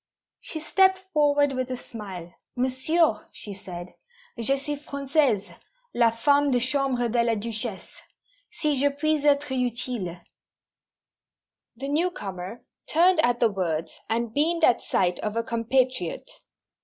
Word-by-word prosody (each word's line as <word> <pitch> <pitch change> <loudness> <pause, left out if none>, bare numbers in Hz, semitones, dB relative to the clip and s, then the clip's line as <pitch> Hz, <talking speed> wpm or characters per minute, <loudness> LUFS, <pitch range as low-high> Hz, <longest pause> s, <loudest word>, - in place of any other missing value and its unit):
She 315 - -6
stepped 380 +4 +4 0.2
forward 290 -2 +3
with 255 -1 -2
a 255 - -3
smile. 190 -8 -9 0.2
"Monsieur," 260 +1 +1
she 205 - -8
said, 180 -2 -9 0.4
"_Je 250 +4 +1
suis 290 +1 -3
Française, 275 -8 0 0.4
la 235 -1 +4
femme 285 +6 +3
de 250 -2 +3
chambre 255 -1 +1
de 235 +1 +2
la 230 -1 +1
Duchesse. 220 -1 -5 0.5
Si 300 -4 0
je 285 +1 +4
puis 305 +2 0
être 290 -1 +3
utile 245 -4 -1
_" 180 - -21 1.5
The 270 +4 -5
newcomer 230 - -2 0.2
turned 350 +2 +4
at 245 -5 +3
the 230 -2 +3
words, 165 -5 -3
and 230 0 -1
beamed 325 +4 +2
at 245 - +5
sight 180 -1 0
of 215 0 -3
a 230 - 0
compatriot. 235 -4 0
250 Hz, 135 wpm, -26 LUFS, 220-285 Hz, 1.5 s, at